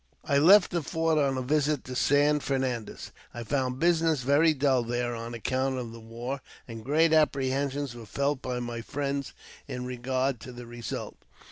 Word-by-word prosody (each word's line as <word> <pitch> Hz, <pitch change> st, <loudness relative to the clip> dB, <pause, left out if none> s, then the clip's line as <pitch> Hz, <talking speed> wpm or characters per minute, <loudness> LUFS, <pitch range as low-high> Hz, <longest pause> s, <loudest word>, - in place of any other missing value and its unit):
I 140 Hz, -, +3 dB
left 185 Hz, +5 st, +7 dB
the 170 Hz, -, 0 dB
fort 160 Hz, +1 st, 0 dB
on 135 Hz, -2 st, +1 dB
a 130 Hz, -, -2 dB
visit 145 Hz, +1 st, +1 dB
to 125 Hz, -, -7 dB
San 145 Hz, +3 st, +3 dB
Fernandez. 130 Hz, -5 st, -3 dB, 0.2 s
I 120 Hz, -, -5 dB
found 130 Hz, +2 st, -1 dB
business 165 Hz, -3 st, +2 dB
very 145 Hz, +5 st, +4 dB
dull 135 Hz, -2 st, +2 dB
there 120 Hz, +1 st, -2 dB
on 115 Hz, +1 st, -6 dB
account 130 Hz, +3 st, -1 dB
of 120 Hz, -3 st, -5 dB
the 115 Hz, -, -10 dB
war, 120 Hz, +4 st, -6 dB, 0.3 s
and 115 Hz, -2 st, -8 dB
great 160 Hz, +5 st, +3 dB
apprehensions 140 Hz, -2 st, +1 dB
were 115 Hz, -2 st, -10 dB
felt 140 Hz, +3 st, -1 dB
by 125 Hz, -1 st, -3 dB
my 120 Hz, -1 st, -4 dB
friends 140 Hz, +2 st, -3 dB, 0.3 s
in 125 Hz, 0 st, -5 dB
regard 130 Hz, +1 st, -1 dB
to 125 Hz, -, -9 dB
the 120 Hz, 0 st, -9 dB
result. 120 Hz, 0 st, -6 dB
130 Hz, 175 wpm, -28 LUFS, 120-145 Hz, 0.3 s, left